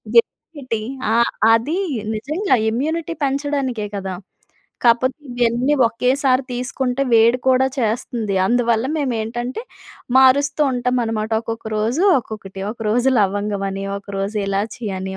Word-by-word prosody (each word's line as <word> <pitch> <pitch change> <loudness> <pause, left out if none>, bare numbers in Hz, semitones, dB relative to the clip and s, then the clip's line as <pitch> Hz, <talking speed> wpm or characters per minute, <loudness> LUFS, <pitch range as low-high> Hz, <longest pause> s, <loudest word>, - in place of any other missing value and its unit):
Gemini-tea. 285 - 0 0.3
ఆ! - - +3 0.4
అది 240 +10 +1 0.4
నిజంగా 300 - 0
ఇమ్యూనిటీ 315 +8 -2
పెంచడానికే 275 -5 -2
కదా! 190 -1 -4 0.7
కాపోతే 240 +2 +3 0.2
ఇయన్నీ 245 +4 +2
ఒకేసారి 255 +3 +1
తీసుకుంటే 250 +1 -2
వేడి 230 +2 +5
కూడా 260 0 +4
చేస్తుంది. 225 -2 -1
అందువల్ల 235 +2 +1
మేము 270 -4 -1
ఏంటంటే 240 - -4 0.6
మారుస్తూ 280 +3 +4
ఉంటాం 250 0 0
అన్నమాట. 225 -1 -2
ఒక్కొక్క 225 0 -6
రోజు 230 +10 0 0.2
ఒక్కొక్కటి. 200 -4 -8
ఒకరోజు 230 +3 0
లవంగం 205 0 0
అని, 195 0 -4
ఒకరోజు 200 +1 -4
ఇలాచీ 210 +3 -3
అని, 190 0 -5
240 Hz, 115 wpm, -20 LUFS, 215-265 Hz, 0.7 s, వేడి